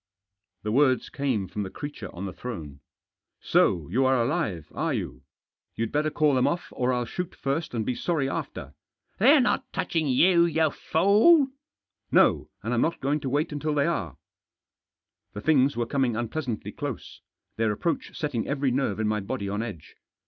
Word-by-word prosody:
The 105 - -2
words 130 +1 +3
came 130 -9 -1
from 105 - -5
the 95 - -4
creature 145 +8 -7
on 90 +3 -6
the 95 - -5
throne. 80 - -7 0.3
" - - -62
So 80 -4 +3
you 130 - +2
are 130 -1 +3
alive, 115 - -1
are - - -1
you? 60 - -5 0.5
You'd 115 0 -2
better 150 +1 +1
call 150 -1 +2
them 130 -1 +3
off, 175 - -2
or 125 0 +1
I'll 125 -1 0
shoot 180 +8 -5
first, 140 0 -2
and 110 -2 -1
be 125 - 0
sorry 150 +1 -1
after." - - -5 0.2
" - - -47
They're 275 +8 +7
not 250 - 0
touching 160 -3 -1
you, 170 +6 +5
you 160 -2 +2
fool! 220 - +4 0.2
" - - -66
" - - -51
No, - - +3
and 115 - -2
I'm 120 - +2
not 165 - 0
going 145 +3 0
to 135 - -3
wait 150 +5 0
until 150 +1 -2
they 140 -1 +2
are." 85 - -2 1.2
The 105 - -6
things 140 -1 +3
were 120 - 0
coming 130 -2 0
unpleasantly 120 0 -3
close - - -6 0.2
— - - -54
their 110 -1 +2
approach 165 +11 -3
setting 140 -7 -2
every 140 -2 0
nerve 125 -5 0
in 110 - +1
my 105 0 0
body 100 +1 -4
on 105 +2 -2
edge. 100 -10 -8
130 Hz, 190 wpm, -26 LUFS, 110-155 Hz, 1.2 s, They're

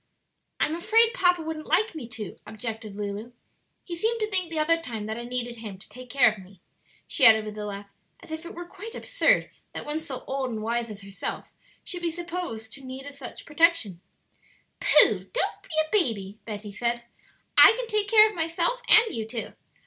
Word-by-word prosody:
"I'm 305 - +1
afraid 445 +7 +4
papa 355 -8 +3
wouldn't 315 -1 -5
like 435 0 +2
me 295 -8 -7
to," 220 -5 -7
objected 220 -2 -6
Lulu; 210 +3 -5 0.5
"he 345 - -6
seemed 450 +7 0
to 430 - +1
think 370 -3 0
the 325 - -5
other 330 +2 +3
time 225 -9 -5
that 220 +2 -4
I 240 - -6
needed 240 -1 -3
him 215 -4 -7
to 195 - -12
take 250 +4 -12
care 245 -3 +5
of 215 - -10
me," 190 0 -18 0.5
she - - 0
added 220 -1 +8
with 210 0 -6
a 210 -1 -5
laugh, 200 0 -6 0.3
as - - -13
if 315 +1 -5
it 340 - -9
were 350 0 -6
quite 425 +6 -10
absurd - - +2 0.2
that - - -6
one 295 +1 -2
so 280 -5 -7
old 265 -1 -2
and 220 -2 -4
wise 235 +1 -1
as 200 -2 -9
herself 195 0 -6 0.3
should 355 -2 -5
be 345 - 0
supposed 340 -10 -5
to 275 - -9
need 265 +2 -8
such 275 -3 -9
protection. 295 - +2 0.8
"Pooh!" - - -4
said - - +9
Betty, - - -5
"don't - - -1
be - - -21
a 315 -1 0 0.2
baby; 200 -2 -6 1.2
I - - +10
can - - -3
take 425 -2 0
care 435 0 +8
of 430 - -5
myself 335 +9 -1
and 440 +1 +6
you 220 -2 -3
too. 225 -1 -5
275 Hz, 200 wpm, -26 LUFS, 220-345 Hz, 1.2 s, I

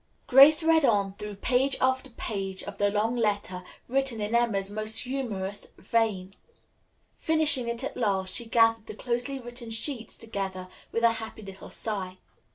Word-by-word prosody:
Grace 285 +5 +7
read 325 -1 +4
on 200 -6 +2
through 210 0 -7
page 255 +6 +1
after 260 +1 +1
page 195 -5 -4
of - - -8
the 205 0 +3
long 215 +4 0
letter, 205 -5 -1 0.2
written 265 -2 0
in 210 +2 -3
Emma's 210 -5 +1
most 215 +1 -1
humorous 220 -7 -4
vein. 205 -5 -1 0.8
Finishing 310 -6 +3
it 235 +2 -3
at - - -4
last, 195 -5 -1
she 235 - -1
gathered 225 -1 +3
the - - -7
closely 245 +4 -3
written 240 -1 -8
sheets 225 0 -1
together 195 -4 -5 0.2
with 230 - -2
a 230 - +6
happy 220 -1 -6
little 195 -1 -10
sigh. 190 -4 -4
225 Hz, 160 wpm, -27 LUFS, 200-250 Hz, 0.8 s, Grace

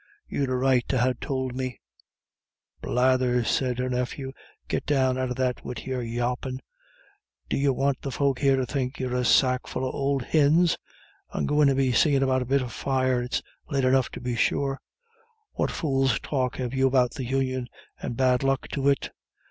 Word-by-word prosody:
You'd 140 -2 -1
a 130 - 0
right 130 -1 +3
to 130 - 0
ha' 125 +1 +2
tould 130 -2 -2
me 130 -3 -4 0.5
" - - -49
"Blathers!" 125 -1 +2
said 125 -2 +1
her 125 0 -1
nephew, 125 +2 -3 0.4
"git - - -2
down 130 -3 +2
out 130 0 -1
of 125 - -3
that 125 -1 -1
wid 125 -2 -6
your 130 -1 -2
yawpin'. 120 +2 -2 0.9
D'you 140 0 +2
want 135 +1 0
the 140 - -4
folk 135 -1 0
here 135 -1 +4
to 130 -1 0
think 130 -1 -3
you're 130 -1 -2
a 125 - +1
sackful 130 +1 +2
of - - -4
ould 140 -1 0
hins? 160 +3 +4 0.6
And - - -1
go 150 +1 +2
in 145 - +6
and 135 - +1
be 135 -2 +2
seein' 140 +1 +3
after 130 0 +2
a - - -2
bit 135 0 +2
of 120 -2 -7
fire; 130 -2 +1
it's 125 +1 -2 0.3
late 135 -2 +1
enough 130 -1 +3
to - - -6
be 125 -1 -3
sure. 135 +4 0 0.7
What - - -1
fool's 135 -3 +1
talk 130 -3 -1
have 125 -1 -3
you 135 0 +3
about 125 -2 +3
the 135 -5 -5
Union, 130 -1 -1 0.3
and 120 - -4
bad 130 -1 +3
luck 135 0 0
to 140 0 +1
it? 140 - 0
130 Hz, 195 wpm, -26 LUFS, 125-135 Hz, 0.9 s, in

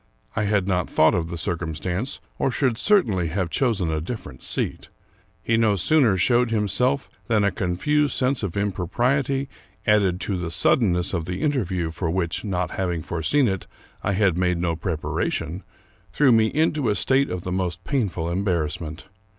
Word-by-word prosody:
I 105 - 0
had 100 -2 +1
not 90 -2 0
thought 80 - +4
of 85 -2 -1
the 85 - -5
circumstance, 85 - -3 0.2
or - - +2
should 125 -3 0
cer 205 -2 +5
tainly 95 -6 -1
have 90 0 -2
chosen 105 -11 +1
a 80 -1 -1
different 80 - -7
seat. - - -3 0.5
He 115 - +2
no 110 -3 +3
sooner 115 - +3
showed 120 +5 +3
himself, 125 +6 +1 0.2
than 110 -3 +2
a 100 - +3
confused 140 +11 0
sense 130 +1 +1
of 100 -3 -3
impropriety, 125 - 0 0.4
added 100 -4 +3
to 100 - -1
the 85 -2 -3
suddenness 90 0 +2
of 85 -3 -1
the 90 +1 -4
interview, 95 - 0
for 85 +1 -3
which, 85 -1 -1
not 90 -5 -2
having 90 -4 -2
foreseen 120 - +1
it, 95 -2 -3 0.4
I 100 - 0
had 95 -3 +2
made 90 -1 +2
no 85 -1 0
preparation, 80 0 -2 0.5
threw 140 -3 +4
me 110 -1 +5
into 155 0 +1
a 105 - +1
state 135 +4 +2
of 90 -1 -4
the 90 - -4
most 90 -1 -2
painful 100 - -1
embarrassment. 85 -3 -2
95 Hz, 170 wpm, -24 LUFS, 85-120 Hz, 0.5 s, cer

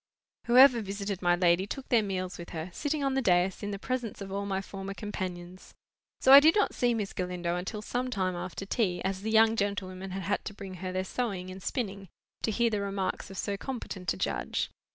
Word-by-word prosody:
Whoever 250 0 +7
visited 200 -1 -4
my 175 -1 +4
lady 175 +1 +3
took 270 +5 -6
their 235 -2 +5
meals 185 -3 -3
with 170 - -8
her, 165 +1 -5
sitting 290 - -2
on 275 -1 +1
the 270 - +1
dais, 180 -3 +2
in 205 - -3
the 200 - -3
presence 245 0 -3
of 195 -1 -7
all 200 +1 -2
my 190 -1 0
former 195 0 -6
companions. 185 -4 -6 0.5
So 265 - +7
I 280 - +13
did 315 +3 +5
not 415 - +2
see 240 -1 +2
Miss 210 -3 -3
Galindo 180 -1 -2
until 200 +4 -4
some 250 +3 -2
time 185 -6 -1
after 180 +2 -5
tea; 195 -4 0
as 190 0 -2
the 220 - -3
young 225 0 +5
gentlewomen 195 -2 -2
had 190 +1 -4
had 200 +3 -1
to 210 - -6
bring 195 -2 -8
her 185 -1 -3
their 185 0 -1
sewing 190 -3 -3
and 190 +1 -9
spinning, 200 -5 -3 0.3
to - - 0
hear 230 +2 +2
the 210 -2 0
remarks 195 -2 -2
of 195 - -9
so 200 +1 -2
competent 205 -7 -4
a - - -3
judge. - - -2
195 Hz, 220 wpm, -29 LUFS, 185-225 Hz, 0.5 s, I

